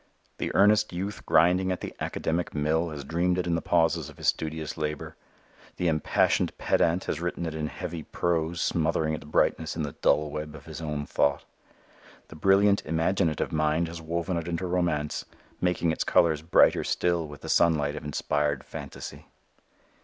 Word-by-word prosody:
The - - -2
earnest 105 +1 +4
youth 95 +4 -4
grinding 90 +3 +4
at 90 - -3
the - - -6
academic 85 +1 -2
mill 80 +3 +1
has 75 -2 -6
dreamed 85 +5 0
it 90 - 0
in 85 - 0
the 85 - 0
pauses 80 -1 +1
of - - -14
his - - -4
studious 80 -1 -3
labor. 75 -1 -4 0.6
The 90 - -1
impassioned 80 -2 +1
pedant 85 +2 +2
has 80 - -3
written 85 0 -2
it 80 - -3
in 80 -1 -2
heavy 85 0 -6
prose 85 +1 -1
smothering 80 -1 +1
its 80 - -5
brightness 80 +1 +1
in 80 - -2
the 75 - -3
dull 75 +1 +1
web 75 0 -5
of 75 - -12
his 80 0 -8
own 75 -2 -3
thought. 70 -1 +1 0.8
The - - -11
brilliant 100 +4 +4
imaginative 80 0 0
mind 75 +2 +1
has 85 0 -7
woven 85 +2 -2
it 85 - -4
into 85 +1 -2
romance, 85 -5 -1 0.4
making 90 -2 +1
its 80 - -1
colors 80 -3 +3
brighter 80 +3 +4
still 85 -2 0
with 75 -1 -11
the - - -8
sunlight 75 -3 +3
of - - -6
inspired 75 -1 -1
phantasy. - - -8
80 Hz, 175 wpm, -27 LUFS, 75-85 Hz, 0.8 s, earnest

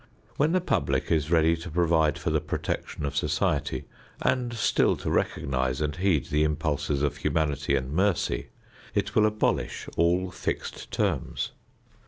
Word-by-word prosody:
When 150 +3 +2
the 185 +1 +2
public 180 - 0
is 80 -2 +2
ready 80 -1 +4
to 85 +2 -7
provide 80 -2 +2
for - - -2
the - - +1
protection 75 - -3
of 70 0 -3
society - - 0 0.3
and 125 -2 +1
still 110 -3 +2
to - - -4
recognize 65 -4 0
and 75 -1 -1
heed 90 -6 +2
the 75 +1 +3
impulses 75 -2 0
of 75 0 0
humanity 75 -2 0
and 65 0 -2
mercy, 90 -8 +1 0.5
it - - 0
will 110 0 +5
abolish 105 0 -1
all 90 +2 +2
fixed - - -4
terms. - - -1
80 Hz, 150 wpm, -27 LUFS, 75-90 Hz, 0.5 s, will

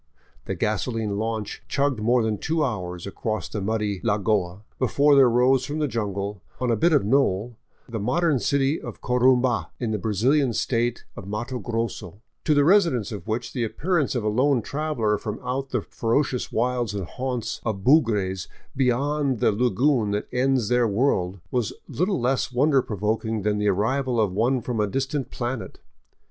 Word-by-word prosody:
The 95 - -3
gasoline 110 +1 -1
launch 110 -1 -3
chugged 140 -4 0
more 120 +2 +2
than 110 -2 -1
two 160 -1 0
hours 90 -8 -4
across 110 +2 -3
the 105 - -5
muddy 105 -1 -1
lagoa 105 -3 0 0.2
before 140 +3 +4
there 135 -3 +7
rose 125 +2 +3
from 145 +3 -4
the 150 -1 0
jungle, 100 -4 -3 0.2
on 125 -1 0
a - - +3
bit 170 +10 +3
of 145 -8 +3
knoll, 120 -2 +1 0.3
the 115 -2 -4
modern 145 - +1
city 140 +4 +1
of - - -8
Corumba, 125 -1 +2
in 120 -3 -2
the 105 - -1
Brazilian 120 +7 +2
State 120 +1 -1
of 100 - -9
Matto 120 +5 -4
Grosso, 115 -5 -4 0.3
to 155 - +3
the 145 - +5
residents 165 - +3
of 100 -4 -7
which 110 +2 -3
the 125 - -1
appearance 150 - 0
of 120 - -1
a - - -1
lone 125 +3 +2
traveler 135 -8 -1
from 105 -1 -5
out 135 +2 -3
the 125 -4 -1
ferocious 125 +2 -1
wilds 120 -2 0
and 100 -3 -3
haunts 125 +3 -4
of 100 -4 -3
bugres 105 - +2 0.3
beyond 135 +1 +1
the - - +3
lagoon 120 +2 +2
that 105 +1 -2
ends 130 -2 +2
their 125 0 +3
world 100 -4 0
was 120 -4 -1
little 185 +3 0
less 130 +2 0
wonder 135 +2 +3
provoking 110 0 -2
than 105 0 +1
the 105 - +1
arrival 125 +5 0
of 105 -4 +2
one 120 +5 +1
from 120 -2 -3
a 105 - +2
distant 135 +4 -2
planet. 120 -1 -5
120 Hz, 175 wpm, -24 LUFS, 105-135 Hz, 0.3 s, there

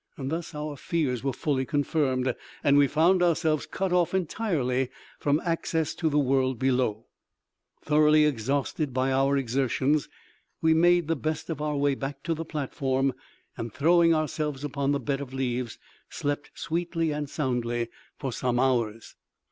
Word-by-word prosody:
Thus 155 +4 -4
our 150 -1 -4
fears 135 -7 -1
were 135 - +1
fully 130 +1 -1
confirmed, 130 -2 0 0.3
and 140 - +4
we 145 -1 +6
found 170 +6 +3
ourselves 160 -3 +2
cut 190 -1 -2
off 180 0 +2
entirely 150 - 0 0.3
from 145 +1 +2
access 165 -2 0
to 160 - 0
the 150 - +1
world 130 -2 +2
below. 125 -4 0 0.8
Thoroughly 150 0 +5
exhausted 140 - -1
by 130 +1 +1
our 135 +1 +3
exertions, 135 +3 +1 0.5
we 160 0 +4
made 175 0 +4
the 165 - +1
best 155 +4 -3
of 150 -2 -4
our 150 -1 -1
way 140 0 +2
back 135 0 -5
to 165 - 0
the 165 +1 -4
platform, 135 -3 -1 0.4
and 115 0 -5
throwing 165 - +4
ourselves 150 -3 -1
upon 140 -1 -1
the 140 - +1
bed 135 +2 -2
of 135 -1 -7
leaves, 125 -3 -2 0.3
slept 145 0 -3
sweetly 165 -1 -1
and 150 -1 -3
soundly 120 -5 -1 0.3
for 135 -4 -4
some 125 0 0
hours. 115 -4 0
145 Hz, 155 wpm, -27 LUFS, 130-155 Hz, 0.8 s, we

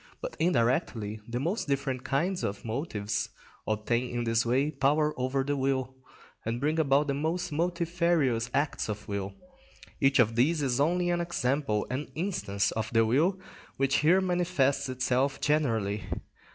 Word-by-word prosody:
But - - -6
indirectly 120 - +1
the 120 +1 -3
most 175 - -1
different 135 -2 -1
kinds 175 +7 0
of 100 +3 -3
motives 110 -4 -2 0.4
obtain 115 +3 0
in 120 0 -2
this 115 0 +1
way 135 +5 +2
power 150 +2 +2
over 130 +1 0
the 145 +1 -1
will, 130 -1 0 0.5
and 115 +2 -2
bring 155 +4 0
about 140 -1 +3
the 140 - -1
most 160 +5 -2
multifarious 170 -7 +1
acts 145 -5 -1
of 105 0 -5
will. 100 -1 -4 0.6
Each 135 -1 +4
of 115 -2 +4
these 150 +6 +2
is 130 -1 0
only 175 +4 +2
an 175 0 +1
example, 140 -9 0
an 135 +4 -3
instance, 155 - -1
of 110 0 -3
the 115 -1 +4
will 155 - +2 0.4
which 135 0 +2
here 175 +5 +4
manifests 170 -7 +1
itself 130 +2 0
generally. 115 -9 0
135 Hz, 150 wpm, -29 LUFS, 120-155 Hz, 0.6 s, Each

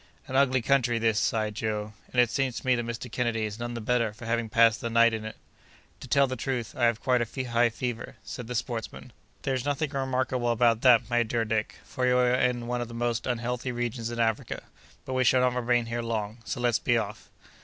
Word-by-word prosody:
"An 130 -1 -6
ugly 130 -2 +3
country 125 -2 +2
this!" 115 -2 +2
sighed 110 -1 0
Joe; 105 -2 -3 0.2
"and 125 - 0
it 120 -2 +4
seems 135 -3 -1
to - - -15
me 130 - +4
that 120 -1 -1
Mr. 115 +1 -5
Kennedy 115 -2 0
is 105 +1 -6
none 120 0 -4
the - - -3
better 115 -1 +1
for 120 +2 -11
having 115 0 -1
passed 115 0 +4
the 115 - -2
night 115 0 +5
in 110 -1 -3
it." 110 - -6 0.6
"To - - -9
tell 140 +2 +4
the 130 -1 -3
truth, 125 -2 -3
I 120 - +2
have 115 -1 +2
quite 125 -2 +3
a 120 +3 -3
high 120 0 +4
fever," 120 +1 -5
said 125 - -7
the 125 - -4
sportsman. 115 -1 -4 0.3
"There's 130 -2 -1
nothing 145 +1 -1
remarkable 130 -3 -1
about 115 -1 +3
that, 120 -3 +5
my 120 0 +3
dear 115 0 0
Dick, 110 0 -1
for 130 - -2
we 125 - +3
are 125 0 +3
in 125 -1 +1
one 120 0 -2
of 120 - -3
the 115 - -9
most 120 0 -1
unhealthy 125 +1 -2
regions 120 -1 -3
in 120 0 -5
Africa; 115 -2 -1 0.4
but 130 - -4
we 130 0 +2
shall 130 +1 +4
not 125 -1 +2
remain 120 -1 +1
here 115 +1 -3
long; 110 -1 -3
so 115 - -4
let's 120 -2 +2
be 120 - +2
off." 105 -2 -5
120 Hz, 235 wpm, -27 LUFS, 115-125 Hz, 0.6 s, night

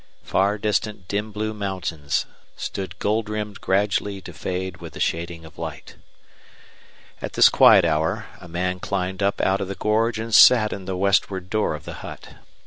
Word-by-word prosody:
Far 100 +2 +1
distant 105 -2 -2
dim 105 +3 -2
blue 110 +1 -3
mountains 90 -8 -2 0.3
stood 95 -1 -5
gold 110 +1 0
rimmed 105 -1 -4
gradually 100 0 0
to 85 - -10
fade 90 +3 -4
with 85 -2 -10
the - - -9
shading 85 0 -2
of 80 - -14
light. - - -7 1.3
At - - -5
this - - +7
quiet - - +7
hour 80 +7 0
a 90 - -12
man 90 +2 -2
climbed 95 0 -3
up 100 0 +1
out 95 +1 +1
of 95 - -3
the 100 - -5
gorge 110 +2 +1
and 110 0 -5
sat 110 -2 +7
in 95 - -7
the 95 -1 -3
westward 95 -1 +1
door 110 -7 +1
of 75 - -10
the - - -6
hut. - - -9
100 Hz, 175 wpm, -23 LUFS, 90-105 Hz, 1.3 s, this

